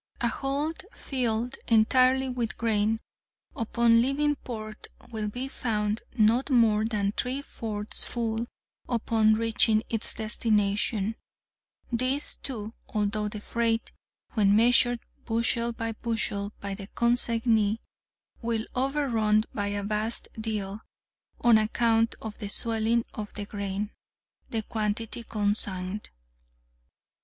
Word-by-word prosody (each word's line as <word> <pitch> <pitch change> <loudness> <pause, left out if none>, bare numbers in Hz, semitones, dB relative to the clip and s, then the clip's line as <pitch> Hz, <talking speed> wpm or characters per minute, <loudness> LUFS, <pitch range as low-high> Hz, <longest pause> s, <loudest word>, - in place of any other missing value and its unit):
A 235 - +1
hold 280 +6 -2
filled 245 -1 -1
entirely 255 +4 +4
with 245 -3 -2
grain 220 0 +1 0.5
upon 230 0 +4
leaving 290 +4 +1
port 215 -5 -7 0.2
will 215 -2 -2
be 245 +5 -4
found 215 -4 -1 0.2
not 230 +5 +4
more 225 -5 +4
than 205 -3 0
three 255 +6 -2
fourths 215 -5 -3
full 230 -1 -2 0.4
upon 225 -2 +3
reaching 220 -1 +3
its 225 -2 0
destination—this, 220 +4 -1
too, 225 -4 -4 0.2
although 210 0 0
the 210 0 -5
freight, 230 +1 0 0.4
when 205 -3 +4
measured 240 +1 +4 0.2
bushel 235 +1 +1
by 230 0 -3
bushel 215 -3 -2
by 200 0 -4
the 195 0 -7
consignee, 230 -3 +2 0.6
will 230 -1 -1
overrun 250 -6 +2
by 205 -1 -1
a 205 0 -2
vast 215 +3 -1
deal 215 -2 -3 0.6
(on 235 -2 +6
account 225 +1 +2
of 220 -1 -5
the 205 - -4
swelling 230 +2 +1
of 210 -1 -5
the 205 - -4
grain) 200 0 -3 0.6
the 225 -1 -2
quantity 220 +2 -2
consigned. 205 -2 -1
225 Hz, 110 wpm, -28 LUFS, 210-235 Hz, 0.6 s, on